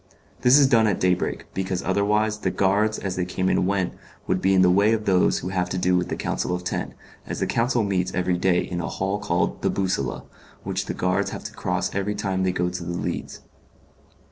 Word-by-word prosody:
This 125 Hz, +3 st, +6 dB
is 145 Hz, -, +6 dB
done 115 Hz, -4 st, +4 dB
at 100 Hz, -, 0 dB
day 90 Hz, 0 st, +3 dB
break, 90 Hz, -, -3 dB
because 95 Hz, -1 st, -2 dB
otherwise 105 Hz, +3 st, +1 dB
the -, -, 0 dB
guards 105 Hz, +3 st, +1 dB
as 95 Hz, -2 st, -4 dB
they 90 Hz, -, +1 dB
came 95 Hz, +1 st, -1 dB
and 90 Hz, -, +2 dB
went 95 Hz, -2 st, 0 dB, 0.3 s
would 95 Hz, 0 st, 0 dB
be 95 Hz, 0 st, +3 dB
in 95 Hz, -, +5 dB
the 90 Hz, -, +5 dB
way 100 Hz, +4 st, +4 dB
of 110 Hz, -1 st, -1 dB
those 90 Hz, -2 st, +3 dB
who 90 Hz, -, -4 dB
have 90 Hz, -1 st, -1 dB
to 95 Hz, -, -2 dB
do 90 Hz, 0 st, +2 dB
with 90 Hz, 0 st, 0 dB
the -, -, -2 dB
Council 90 Hz, -, -2 dB
of 90 Hz, -, -6 dB
Ten, 90 Hz, -, -3 dB, 0.3 s
as -, -, -4 dB
the -, -, +1 dB
Council 120 Hz, 0 st, +1 dB
meets 95 Hz, -3 st, 0 dB
every 90 Hz, -1 st, 0 dB
day 90 Hz, -1 st, +3 dB
in 90 Hz, -1 st, -4 dB
a -, -, -3 dB
hall 95 Hz, +2 st, -2 dB
called 90 Hz, -4 st, -1 dB
The -, -, +1 dB
Bussola, 95 Hz, -9 st, -1 dB, 0.4 s
which -, -, -3 dB
the -, -, -3 dB
guards 90 Hz, 0 st, 0 dB
have -, -, -7 dB
to -, -, -7 dB
cross -, -, -2 dB
every 100 Hz, +1 st, -1 dB
time 95 Hz, -2 st, -1 dB
they 95 Hz, 0 st, +2 dB
go 90 Hz, 0 st, 0 dB
to 90 Hz, 0 st, -4 dB
the 85 Hz, 0 st, -4 dB
Leads. -, -, -4 dB
95 Hz, 235 wpm, -24 LUFS, 90-100 Hz, 0.4 s, This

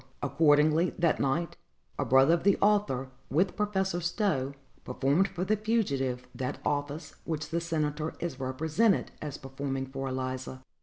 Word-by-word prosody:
Accordingly, 150 Hz, +3 st, +3 dB
that 170 Hz, -2 st, +2 dB
night, 155 Hz, +5 st, 0 dB, 0.4 s
a -, -, +1 dB
brother 135 Hz, +6 st, +5 dB
of 170 Hz, -, +1 dB
the 200 Hz, +1 st, +4 dB
author, 200 Hz, -11 st, +2 dB, 0.2 s
with 180 Hz, +6 st, +1 dB
Professor 190 Hz, -4 st, 0 dB
Stowe, 160 Hz, -, 0 dB, 0.3 s
performed 140 Hz, +9 st, +2 dB
for 180 Hz, -1 st, -4 dB
the 215 Hz, +3 st, +2 dB
fugitive 140 Hz, -, -1 dB
that 130 Hz, -1 st, -3 dB
office 145 Hz, +2 st, -2 dB
which 155 Hz, -2 st, -3 dB
the 170 Hz, +1 st, 0 dB
senator 155 Hz, -2 st, -2 dB
is 165 Hz, -6 st, -4 dB
represented 160 Hz, -, +1 dB
as 150 Hz, -3 st, -5 dB
performing 135 Hz, 0 st, -4 dB
for 135 Hz, 0 st, -5 dB
Eliza. 130 Hz, 0 st, -4 dB
150 Hz, 145 wpm, -29 LUFS, 135-175 Hz, 0.4 s, brother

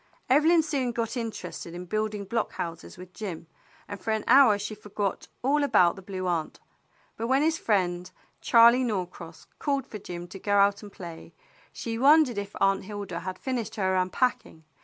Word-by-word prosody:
Evelyn 320 Hz, +4 st, +5 dB
soon 275 Hz, -5 st, -1 dB
got 230 Hz, +1 st, -3 dB
interested 225 Hz, -7 st, -6 dB
in 180 Hz, +1 st, -7 dB
building 215 Hz, +1 st, -2 dB
block 225 Hz, +2 st, -2 dB
houses 165 Hz, 0 st, -6 dB
with 180 Hz, 0 st, -12 dB
Jim, 180 Hz, -7 st, -6 dB, 0.4 s
and 205 Hz, -, -7 dB
for -, -, -5 dB
an 220 Hz, -1 st, 0 dB
hour 250 Hz, -5 st, +6 dB
she 205 Hz, +1 st, -5 dB
forgot 205 Hz, -1 st, -4 dB, 0.2 s
all 290 Hz, +3 st, +2 dB
about 195 Hz, -11 st, +4 dB
the 195 Hz, -, -10 dB
Blue 185 Hz, -1 st, -5 dB
Aunt; 170 Hz, -3 st, -2 dB, 0.6 s
but 230 Hz, -, -3 dB
when 265 Hz, +3 st, +3 dB
his 320 Hz, +1 st, +1 dB
friend, 180 Hz, -4 st, 0 dB, 0.3 s
Charley 235 Hz, +2 st, +6 dB
Norcross, 180 Hz, -7 st, -5 dB
called 280 Hz, -3 st, -1 dB
for 215 Hz, -6 st, -8 dB
Jim 175 Hz, -2 st, -7 dB
to 195 Hz, -, -9 dB
go 205 Hz, +1 st, +1 dB
out 200 Hz, 0 st, +3 dB
and 205 Hz, -1 st, -11 dB
play, 170 Hz, -4 st, -10 dB, 0.4 s
she 225 Hz, -1 st, -5 dB
wondered 280 Hz, -4 st, +5 dB
if 200 Hz, 0 st, -7 dB
Aunt 195 Hz, -1 st, +2 dB
Hilda 200 Hz, -4 st, -5 dB
had 185 Hz, +1 st, -6 dB
finished 240 Hz, -5 st, -3 dB
her 190 Hz, -2 st, 0 dB
unpacking. 185 Hz, -2 st, -1 dB
205 Hz, 180 wpm, -27 LUFS, 185-240 Hz, 0.6 s, hour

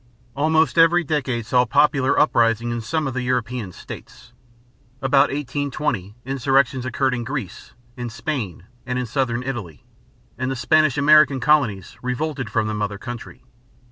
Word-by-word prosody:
Almost 160 Hz, +2 st, +2 dB
every 170 Hz, +2 st, +5 dB
decade 135 Hz, -7 st, -2 dB
saw 125 Hz, +2 st, +3 dB
popular 135 Hz, +2 st, +3 dB
uprisings 120 Hz, -4 st, +2 dB
in 120 Hz, -, -3 dB
some 155 Hz, +7 st, -2 dB
of 135 Hz, -, -3 dB
the 130 Hz, -, -2 dB
European 125 Hz, -4 st, -2 dB
states. 120 Hz, +6 st, -12 dB, 0.7 s
About 135 Hz, +1 st, +3 dB
1820 140 Hz, -7 st, -3 dB
insurrections 135 Hz, -1 st, +1 dB
occurred 130 Hz, +1 st, 0 dB
in 120 Hz, -1 st, -2 dB
Greece, 125 Hz, -7 st, -6 dB, 0.2 s
in 120 Hz, -1 st, -5 dB
Spain, 115 Hz, -, -4 dB, 0.2 s
and 125 Hz, 0 st, -3 dB
in 125 Hz, -, -1 dB
southern 120 Hz, 0 st, -1 dB
Italy; 110 Hz, -, -6 dB, 0.5 s
and 130 Hz, 0 st, -1 dB
the 135 Hz, -, -2 dB
Spanish 145 Hz, +3 st, +3 dB
American 150 Hz, -1 st, +5 dB
colonies 125 Hz, -, +1 dB
revolted 130 Hz, 0 st, -3 dB
from 110 Hz, -1 st, 0 dB
the 110 Hz, -, -2 dB
mother 105 Hz, -1 st, -3 dB
country. 120 Hz, +2 st, -9 dB
130 Hz, 145 wpm, -22 LUFS, 115-145 Hz, 0.7 s, every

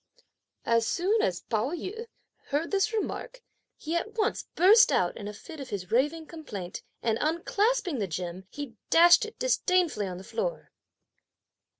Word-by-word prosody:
As 230 Hz, -1 st, +2 dB
soon 405 Hz, +5 st, +1 dB
as 175 Hz, -2 st, 0 dB
Pao 230 Hz, +6 st, -1 dB
yü 435 Hz, +7 st, -6 dB, 0.4 s
heard 295 Hz, +4 st, -2 dB
this 395 Hz, +1 st, +2 dB
remark, 465 Hz, +2 st, -4 dB, 0.3 s
he 325 Hz, +2 st, -4 dB
at 430 Hz, +6 st, -2 dB
once 425 Hz, -, 0 dB
burst 425 Hz, +6 st, +7 dB
out 175 Hz, -1 st, +1 dB
in 205 Hz, -, -7 dB
a -, -, -4 dB
fit 315 Hz, +8 st, -11 dB
of 275 Hz, -, -7 dB
his 185 Hz, -3 st, -5 dB
raving 295 Hz, +7 st, +1 dB
complaint, 210 Hz, -, -7 dB, 0.2 s
and 225 Hz, -1 st, +1 dB
unclasping 365 Hz, -, 0 dB
the 200 Hz, -, -1 dB
gem, 180 Hz, +2 st, -5 dB
he 285 Hz, -6 st, -8 dB
dashed 345 Hz, +4 st, +7 dB
it 440 Hz, -, -10 dB
disdainfully 365 Hz, -, +1 dB
on 180 Hz, -1 st, -5 dB
the 185 Hz, -, -9 dB
floor. -, -, -4 dB
320 Hz, 160 wpm, -28 LUFS, -, 0.4 s, burst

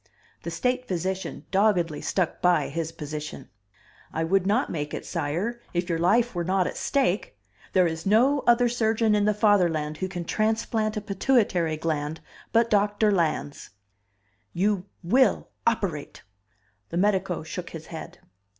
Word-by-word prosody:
The 170 Hz, -, -5 dB
state 250 Hz, +8 st, -1 dB
physician 185 Hz, 0 st, -3 dB
doggedly 190 Hz, -6 st, +2 dB
stuck 180 Hz, -4 st, -1 dB
by 175 Hz, -4 st, +3 dB
his 165 Hz, +2 st, -3 dB
position. 150 Hz, -, -7 dB, 0.6 s
"I 160 Hz, -, -1 dB
would 190 Hz, +3 st, +2 dB
not 220 Hz, +7 st, +1 dB
make 150 Hz, -2 st, -3 dB
it, -, -, -6 dB
sire, 175 Hz, +10 st, -2 dB
it 175 Hz, +1 st, -1 dB
your 165 Hz, -1 st, 0 dB
life 225 Hz, +8 st, +3 dB
were 175 Hz, -1 st, -2 dB
not 185 Hz, +1 st, +1 dB
at -, -, -3 dB
stake. 210 Hz, -, 0 dB, 0.4 s
There 185 Hz, -2 st, +5 dB
is 160 Hz, -1 st, -2 dB
no 245 Hz, +8 st, +4 dB
other 240 Hz, +1 st, +5 dB
surgeon 225 Hz, -2 st, +1 dB
in 205 Hz, -1 st, +3 dB
the 210 Hz, -, +3 dB
Fatherland 175 Hz, -8 st, +2 dB
who 185 Hz, -, -2 dB
can 180 Hz, -2 st, -5 dB
transplant 215 Hz, +1 st, 0 dB
a -, -, -2 dB
pituitary 195 Hz, -6 st, +1 dB
gland 155 Hz, -1 st, -2 dB, 0.3 s
but 230 Hz, 0 st, +3 dB
Doctor 205 Hz, +1 st, +3 dB
Lans." 160 Hz, -6 st, -1 dB, 0.8 s
"You 195 Hz, 0 st, 0 dB, 0.2 s
will 255 Hz, +10 st, +3 dB, 0.2 s
operate!" 190 Hz, -10 st, -1 dB, 0.7 s
The -, -, -3 dB
medico 190 Hz, -3 st, +1 dB
shook 170 Hz, +2 st, -6 dB
his 160 Hz, -1 st, -9 dB
head. 170 Hz, +2 st, -8 dB
185 Hz, 150 wpm, -26 LUFS, 165-215 Hz, 0.8 s, There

